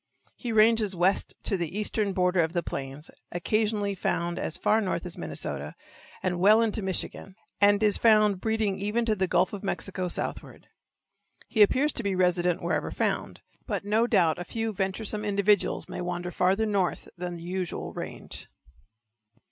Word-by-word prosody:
He 240 - -5
ranges 220 -2 +4
west 180 +3 +1
to 195 - +2
the 175 +2 -4
eastern 210 -1 -1
border 180 -1 +1
of 160 0 -1
the 175 -2 0
plains, 135 +2 -6 0.2
occasionally 205 +3 0
found 170 -2 -1
as 160 - -3
far 220 +1 +2
north 185 -3 -2
as 175 - -5
Minnesota - - -4 0.5
and 180 -1 -1
well 210 +4 +6
into 220 -1 -1
Michigan, 190 0 -2 0.2
and 205 +1 +4
is 210 -1 +3
found 215 -4 +4
breeding 220 -3 0
even 210 +4 0
to 220 -2 +1
the 190 -2 0
Gulf 180 +2 +2
of 205 - -6
Mexico 190 -2 -2
southward. - - -5 0.8
He 220 - +1
appears 265 +8 +4
to - - -2
be 200 -2 -1
resident 180 -1 +1
wherever 160 -3 -1
found, - - -2 0.3
but - - -3
no 220 +3 +2
doubt 175 -9 +3
a - - -3
few 225 +4 -3
venturesome 200 +2 -1
individuals 205 0 +2
may - - -5
wander 180 0 -3
farther 190 +5 +2
north 200 -4 -1
than 175 0 -5
the 170 - -9
usual 180 0 -4
range. - - -7
195 Hz, 165 wpm, -27 LUFS, 180-215 Hz, 0.8 s, well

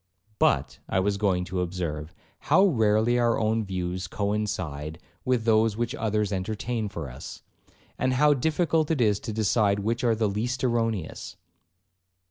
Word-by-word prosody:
'But, - - +2
I - - +1
was 100 +1 +1
going 95 -3 +1
to 90 0 -2
observe, 85 -3 -4 0.3
how 180 +7 +6
rarely 110 - +3
our 120 -1 +2
own 110 +1 +1
views 90 -2 -3
coincide 90 -7 -3 0.3
with 125 -3 +1
those 110 -1 +3
which 120 +1 -1
others 105 -6 -1
entertain 110 +3 -2
for 85 -7 -6
us, 65 - -9 0.6
and 130 0 +1
how 145 +3 +5
difficult 160 +2 +1
it 160 -4 +1
is 105 -4 +3
to 110 - -5
decide 105 -1 +2
which 115 +4 -1
are 115 -2 +3
the 110 -1 +1
least 115 +6 -2
erroneous.' 115 -8 -1
110 Hz, 150 wpm, -26 LUFS, 95-120 Hz, 0.6 s, how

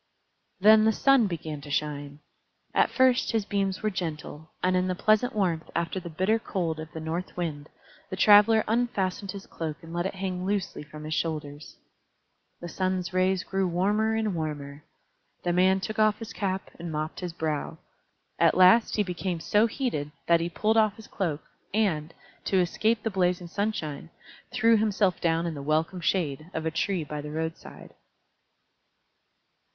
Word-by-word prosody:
Then 215 +2 +7
the 220 - +5
Sun 265 0 +4
began 155 -4 -5
to 145 - -11
shine. 145 0 -3 0.5
At - - +3
first 255 -1 +3
his 220 -3 +1
beams 195 -1 -1
were 215 - +1
gentle, 160 -3 -5
and 185 0 +2
in 185 0 +1
the 185 - -1
pleasant 215 +4 +2
warmth 175 -6 0
after 170 +3 -1
the 175 -1 -8
bitter 190 +8 +1
cold 170 -7 -2
of 155 0 -8
the 160 - -6
North 165 +4 -4
Wind, 155 -4 -4 0.4
the - - -4
Traveler 210 +3 +6
unfastened 205 -4 -1
his 195 0 -9
cloak 160 -2 -5
and 165 0 -10
let 175 +2 0
it 195 - -7
hang 185 -1 -3
loosely 195 0 -2
from 150 +1 -10
his 155 +1 -4
shoulders. 150 -3 -4 0.9
The 175 - -5
Sun's 185 0 -2
rays 185 0 +2
grew 190 -1 -1
warmer 205 +5 +1
and 220 -2 0
warmer. 150 -3 -5 0.6
The 175 - 0
man 190 +2 +4
took 215 +3 -5
off 215 -1 +4
his 225 -1 -8
cap 190 -1 -3
and 170 0 -5
mopped 155 +1 -3
his 180 -2 -4
brow. 155 -3 -3 0.6
At - - +4
last 185 +5 +6
he 210 - +2
became 180 -1 -3
so 210 +7 +3
heated 220 - -2 0.2
that 170 -1 +4
he 170 +1 -2
pulled 220 +5 +1
off 215 -2 +3
his 220 - -12
cloak, 160 -6 -3 0.3
and, 170 -8 +1 0.3
to 195 - +1
escape 215 +5 +1
the 225 - -1
blazing 180 -2 +1
sunshine, 170 -6 -3 0.4
threw 230 -2 +4
himself 205 -3 +1
down 165 0 +1
in 170 - -2
the 145 - -6
welcome 160 +5 0
shade 155 -3 -1
of 160 0 -3
a 160 - 0
tree 175 +1 -1
by 150 0 -5
the 150 - -7
roadside. 160 +2 -6
180 Hz, 175 wpm, -27 LUFS, 160-205 Hz, 0.9 s, Then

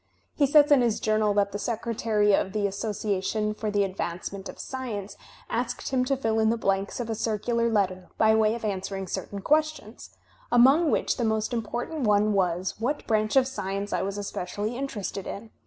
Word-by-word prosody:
He 285 - +2
says 295 +1 +5
in 280 -3 +7
his 235 -3 +1
Journal 215 -1 +2
that 200 -1 +2
the 205 - -4
Secretary 220 -2 0
of 190 0 +1
the 210 -1 0
Association 210 +1 -1
for 215 0 -3
the 205 -1 +2
Advancement 190 +1 -4
of - - -9
Science 215 -7 -5 0.3
asked 240 +1 -2
him 255 -1 +1
to 275 +1 0
fill 225 -3 0
in 220 0 +3
the 230 - +1
blanks 195 -1 -1
of 240 - -3
a 225 - -2
circular 230 +2 0
letter 185 -4 0
by 220 0 +5
way 220 0 +3
of 235 - -6
answering 195 -1 -3
certain 200 +2 -5
questions, 305 -5 -1 0.4
among 270 +7 +6
which - - +1
the 245 - -1
most 220 +1 0
important 240 +7 -3
one 210 -2 +3
was, 185 -1 0
what 275 +6 -2
branch 215 0 +1
of 265 -1 +5
science 200 -5 -4
I - - +1
was 195 +1 -3
espe 200 -3 -4
cially 205 +5 -3
interested 225 -7 -4
in. 220 +2 -7
215 Hz, 190 wpm, -26 LUFS, 200-240 Hz, 0.4 s, in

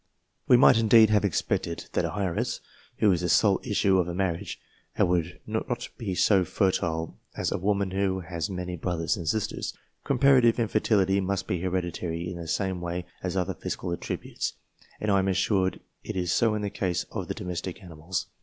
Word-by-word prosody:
We 125 - +7
might, 120 -1 +7
indeed, 110 -1 +6
have 105 -1 +4
expected 85 -3 -1
that - - +1
an 105 - -3
heiress, 90 -4 -1 0.4
who 105 - +4
is 90 -2 +1
the 90 - -1
sole 100 +2 +4
issue 100 -4 +2
of 90 - +1
a 85 - -4
marriage, 95 0 -2 0.4
would 90 0 +1
not 120 +2 -3
be 100 -6 -3
so 95 0 +4
fertile 80 - -1 0.2
as - - -1
a - - -1
woman 100 0 0
who 95 -1 0
has 85 +1 -4
many 90 -1 -4
brothers 85 +2 -1
and 85 -6 -6
sisters. 110 -1 -2 0.3
Comparative 130 -3 +4
infertility 105 -3 +2
must 95 0 -1
be 90 - -2
hereditary 90 -2 -2
in 90 -1 -5
the 85 -1 -7
same 95 +1 -1
way 85 +1 -3 0.2
as 95 +1 -2
other 95 +1 0
physical 90 +1 -4
attributes, 85 - -4 0.5
and 105 - 0
I 100 - +4
am 95 - 0
assured 95 0 +1 0.2
it - - -5
is 90 -2 -1
so 110 +3 +3
in 105 - -3
the 100 - -2
case 90 -2 -1
of - - -4
the - - -3
domestic 90 +1 -5
animals. 85 0 -4
95 Hz, 185 wpm, -27 LUFS, 90-105 Hz, 0.5 s, We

